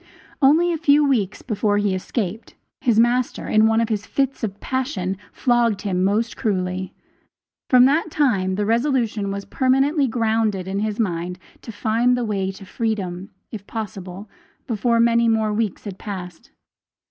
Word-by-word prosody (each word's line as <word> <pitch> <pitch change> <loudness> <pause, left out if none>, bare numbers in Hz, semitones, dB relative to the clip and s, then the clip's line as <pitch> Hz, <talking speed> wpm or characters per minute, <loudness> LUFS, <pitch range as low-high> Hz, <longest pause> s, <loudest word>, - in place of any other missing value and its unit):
Only 325 +6 +4
a 325 - -3
few 295 -1 +4
weeks 210 -8 0
before 210 -3 0
he 205 -2 +1
escaped, 205 +2 -4 0.2
his 230 -3 +2
master, 240 +1 +1
in 215 0 +4
one 225 0 +2
of 230 0 0
his 210 -2 -2
fits 270 -2 -1
of 205 -2 -3
passion, 245 -8 -2 0.2
flogged 235 -5 +1
him 185 -3 0
most 215 +4 0
cruelly. 185 -2 -2 0.7
From 250 -1 +7
that 305 +5 +2
time 200 -12 +1
the 205 +1 -1
resolution 230 -3 0
was 200 0 -4
permanently 270 +2 +2
grounded 220 -5 0
in 195 +1 -2
his 215 +1 -2
mind 180 -3 -2 0.2
to 230 - -8
find 230 +3 +1
the 245 - -1
way 195 -3 -1
to 195 +1 -12
freedom, 195 -4 -3 0.2
if 205 -3 -8
possible, 195 -3 -6 0.4
before 230 0 +1
many 235 0 +4
more 220 -1 +1
weeks 215 -2 -2
had 195 -3 -8
passed. 180 -5 -8
220 Hz, 160 wpm, -22 LUFS, 195-245 Hz, 0.7 s, From